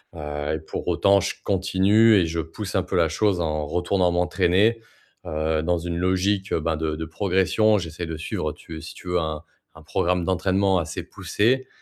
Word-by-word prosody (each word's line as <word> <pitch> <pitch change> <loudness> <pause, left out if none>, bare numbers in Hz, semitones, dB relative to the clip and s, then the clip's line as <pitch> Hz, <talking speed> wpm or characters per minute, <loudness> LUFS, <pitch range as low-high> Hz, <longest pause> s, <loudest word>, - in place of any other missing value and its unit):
heu 75 0 -4
et - - -4
pour 80 - -7
autant, 100 +3 +4
je 100 - -2
continue 100 +3 +4
et 95 - +4
je 80 0 -3
pousse 90 +4 -5
un 95 - +2
peu 90 - -4
la 85 -1 +4
chose 95 +2 +1
en 75 -2 -1
retournant 90 +2 +1
m'entraîner, 90 +6 +2 0.4
heu, 80 0 -1
dans 90 +1 +1
une 85 0 -4
logique, 95 +2 0
heu - - +1
ben, 80 0 0
de 80 -1 -2
de 80 - -4
progression, 95 +5 +2
j'essaie 85 -1 -5
de 80 -1 -5
suivre 80 - -3
tu 80 -1 -10
es - - -8
si 80 -1 -9
tu - - -13
veux 90 - +2
un 80 -1 -3 0.3
un - - -14
programme 90 0 0
d'entraînement 95 +1 +2
assez 85 -1 -4
poussé. 130 +5 0
90 Hz, 200 wpm, -24 LUFS, 80-95 Hz, 0.4 s, autant